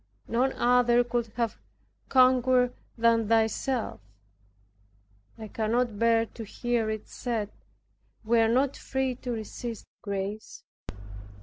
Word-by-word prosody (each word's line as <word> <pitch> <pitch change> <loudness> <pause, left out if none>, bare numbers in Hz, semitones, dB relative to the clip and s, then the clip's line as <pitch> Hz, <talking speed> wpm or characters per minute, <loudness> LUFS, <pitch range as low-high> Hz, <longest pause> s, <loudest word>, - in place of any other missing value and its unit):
None 250 +3 +1
other 245 0 +4
could 240 -1 -1
have 230 -2 -2 0.5
conquered 255 -1 +4 0.2
than 230 -1 +3
Thyself. 225 +2 0 1.4
I 220 -1 -7
cannot 225 0 -1
bear 230 0 +4
to 225 - -9
hear 235 +1 -1
it 215 -1 -4
said, 225 -4 -3 0.7
"We 230 +1 +3
are 225 0 +4
not 265 +3 +2
free 265 -1 -2
to 250 - -5
resist 225 +1 -6 0.2
grace." 200 0 -5
235 Hz, 110 wpm, -28 LUFS, 220-250 Hz, 1.4 s, other